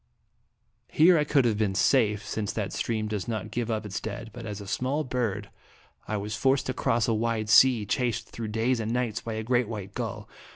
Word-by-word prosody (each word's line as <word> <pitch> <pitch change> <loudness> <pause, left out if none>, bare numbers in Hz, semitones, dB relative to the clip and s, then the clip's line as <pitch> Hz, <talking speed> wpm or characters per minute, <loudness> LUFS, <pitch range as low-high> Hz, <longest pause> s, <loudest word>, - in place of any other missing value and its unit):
Here 175 +3 +6
I - - +3
could 145 -3 +2
have 110 -3 +1
been 100 -3 +1
safe, 105 0 +2
since 105 -1 -3
that 105 -3 -3
stream 110 -2 -1
does 105 -3 -3
not 110 -4 -4
give 120 -1 -2
up 110 -1 -2
its 100 0 -4
dead, 110 +1 -6
but 115 -2 -8
as 105 -1 -5
a 100 - -8
small 130 +9 -1
bird 115 -6 -2 0.6
I 110 - -1
was 105 +2 -4
forced 135 0 +2
to 130 - -2
cross 120 -3 +1
a 115 - +2
wide 110 -1 -1
sea, 120 -2 +6
chased 120 +1 -1
through 115 -1 -5
days 115 +3 0
and 110 0 -2
nights 120 -2 -1
by 115 - -5
a 110 0 -3
great 120 0 +1
white 105 -3 -6
gull. - - -5
110 Hz, 215 wpm, -27 LUFS, 105-125 Hz, 0.6 s, Here